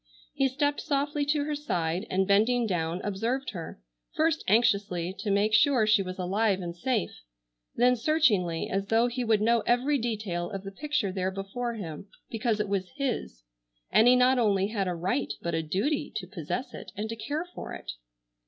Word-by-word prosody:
He 270 - +2
stepped 285 +2 0
softly 290 0 0
to 290 0 +1
her 300 +1 -2
side 180 - -2
and 190 +1 +1
bending 225 +4 +3
down 175 -3 -1
observed 230 +7 -2
her, 170 - -7 0.4
first 320 -1 +1
anxiously, 200 -5 +2
to 215 - -3
make 205 +2 +2
sure 250 -1 +5
she 215 -1 +4
was 185 -1 -5
alive 195 +2 +1
and 170 -2 -5
safe, 220 +3 -2 0.5
then 250 +1 +4
searchingly, 220 - +2
as 195 +1 -2
though 225 +2 +3
he 245 +1 -2
would 220 -3 +2
know 235 +1 +4
every 265 +4 +2
detail 210 -7 -2
of 195 -2 -6
the 195 - -7
picture 275 -3 -1
there 185 0 -1
before 200 +5 -4
him 175 -3 -7 0.2
because 225 -1 0
it 210 - 0
was 195 -2 -1
his, 245 - -3 0.5
and 225 - +6
he 250 - +7
not 250 +1 +4
only 200 -3 +2
had 200 -4 -1
a 180 - -1
right 165 -5 -1
but 170 - -3
a 160 - +1
duty 215 - -1
to 210 -4 -3
possess 200 - -5
it, - - -9
and 210 +1 -3
to 225 - -3
care 290 +10 -3
for - - -7
it. - - -6
215 Hz, 190 wpm, -28 LUFS, 190-250 Hz, 0.5 s, he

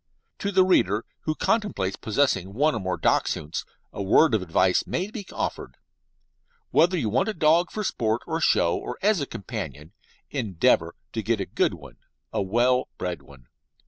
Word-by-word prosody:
To 200 - -2
the 190 -1 +5
reader 110 - +2 0.2
who 155 - 0
contemplates 205 - 0
possessing 100 -5 0
one 150 +5 +3
or - - -2
more 95 -2 -2
Dachshunds 75 +2 0 0.3
a - - -5
word 115 +8 +4
of 110 - +2
advice 90 +1 +2
may 190 +4 -2
be 205 -4 -7
offered. - - -4 0.9
Whether 175 +3 +4
you 130 -9 -1
want 130 - +1
a 220 - -3
dog 165 +2 +3
for 215 - -4
sport, 115 - -1
for 160 +1 -2
show, 85 - +3
or - - -5
as 205 -5 +3
a 140 - -2
companion, 80 -3 -7 0.4
endeavour 110 - +1 0.2
to 110 - -2
get 110 +1 0
a 95 - -2
good 95 -1 0
one 70 -6 -14 0.4
a - - 0
well 120 +6 +2
bred 90 -1 -4
one. 70 -3 -17
115 Hz, 175 wpm, -25 LUFS, -, 0.9 s, the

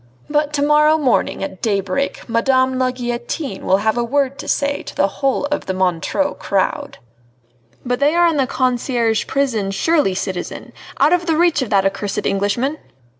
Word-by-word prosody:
But 295 0 +1
to 285 -1 0
morrow 300 +1 +4
morning 265 -8 0
at 190 -1 -6
daybreak 200 +5 -1
Madame 260 +2 +2
la 255 0 +2
Guillotine 240 0 -4
will 190 - +3
have 220 +2 +2
a - - +1
word 275 +2 0
to - - -7
say 285 0 0
to - - -10
the 195 - +3
whole 270 +7 -1
of 295 - -2
the 190 - -2
Montreux 185 - 0
crowd!" 195 -1 -1 0.9
"But 245 0 -1
they 290 +3 +3
are 345 0 +4
in 325 -3 +1
the 270 -2 +2
Conciergerie 245 -3 0
prison 245 -8 0
surely, 240 - +1
citizen! 185 -1 -5 0.3
out 295 +5 +4
of 350 0 +1
the 320 -2 +2
reach 345 -3 +3
of 255 - -3
that 195 -2 +2
accursed 200 +1 -2
Englishman?" 205 +10 0
255 Hz, 175 wpm, -19 LUFS, 205-290 Hz, 0.9 s, morrow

